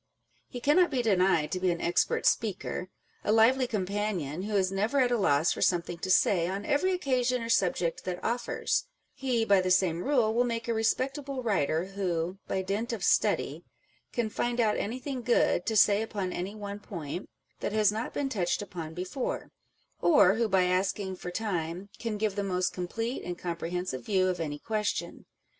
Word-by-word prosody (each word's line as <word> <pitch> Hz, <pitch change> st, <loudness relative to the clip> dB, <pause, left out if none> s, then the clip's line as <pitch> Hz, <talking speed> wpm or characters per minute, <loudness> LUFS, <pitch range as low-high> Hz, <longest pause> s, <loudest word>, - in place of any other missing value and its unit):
He 245 Hz, -, -7 dB
cannot 305 Hz, +8 st, +4 dB
be 255 Hz, -4 st, 0 dB
denied 180 Hz, -7 st, +2 dB
to 185 Hz, -, -1 dB
be 185 Hz, 0 st, +1 dB
an 170 Hz, -1 st, -1 dB
expert 170 Hz, -, +1 dB
speaker, 195 Hz, -3 st, 0 dB, 0.3 s
a -, -, +1 dB
lively 245 Hz, +4 st, +4 dB
companion, 195 Hz, -, -2 dB
who 210 Hz, +2 st, -3 dB
is 190 Hz, -1 st, +2 dB
never 215 Hz, +8 st, +1 dB
at 250 Hz, -2 st, +3 dB
a -, -, +3 dB
loss 160 Hz, -7 st, +3 dB
for -, -, -7 dB
something 175 Hz, -1 st, +1 dB
to 185 Hz, -, -4 dB
say 185 Hz, -2 st, +4 dB
on 195 Hz, +3 st, -4 dB
every 330 Hz, +7 st, +2 dB
occasion 255 Hz, -8 st, 0 dB
or 230 Hz, -, -5 dB
subject 180 Hz, -5 st, +1 dB
that 180 Hz, -1 st, -3 dB
offers: 240 Hz, -, -1 dB, 0.3 s
he, 255 Hz, -5 st, 0 dB
by 200 Hz, -3 st, +5 dB
the 185 Hz, -, -1 dB
same 180 Hz, -2 st, +2 dB
rule, 245 Hz, -6 st, +2 dB
will 240 Hz, +2 st, +3 dB
make 230 Hz, -1 st, -3 dB
a 235 Hz, -, +1 dB
respectable 265 Hz, +4 st, -1 dB
writer, 170 Hz, -6 st, +1 dB
who, 185 Hz, -2 st, -2 dB
by 190 Hz, -, -1 dB
dint 205 Hz, +5 st, -2 dB
of 220 Hz, -6 st, -4 dB
study, -, -, +1 dB, 0.5 s
can 235 Hz, -2 st, -1 dB
find 240 Hz, +3 st, -1 dB
out 215 Hz, -3 st, +3 dB
anything 255 Hz, +4 st, -3 dB
good 235 Hz, -6 st, +2 dB
to 220 Hz, -, 0 dB
say 205 Hz, 0 st, +5 dB
upon 200 Hz, -4 st, -3 dB
any 190 Hz, +4 st, -4 dB
one 205 Hz, -1 st, -6 dB
point 170 Hz, -3 st, -6 dB, 0.3 s
that -, -, -2 dB
has 215 Hz, -1 st, +4 dB
not 220 Hz, +3 st, -3 dB
been 285 Hz, -, -1 dB
touched 195 Hz, -6 st, -1 dB
upon 170 Hz, -5 st, -7 dB
before, 185 Hz, +9 st, -4 dB, 0.5 s
or 200 Hz, -, +6 dB
who 225 Hz, +1 st, +1 dB
by 190 Hz, -1 st, +4 dB
asking 185 Hz, +1 st, 0 dB
for 180 Hz, -, -7 dB
time, 180 Hz, -2 st, -3 dB
can 225 Hz, -2 st, -3 dB
give 210 Hz, -2 st, -1 dB
the 205 Hz, -, -1 dB
most 185 Hz, -2 st, 0 dB
com 180 Hz, -1 st, -4 dB
plete 230 Hz, +6 st, -3 dB
and 175 Hz, -1 st, -5 dB
comprehensive 175 Hz, -4 st, -4 dB
view 190 Hz, -3 st, +2 dB
of 180 Hz, -, -2 dB
any 150 Hz, -3 st, -3 dB
question. 210 Hz, +4 st, -3 dB
200 Hz, 190 wpm, -29 LUFS, 180-230 Hz, 0.5 s, or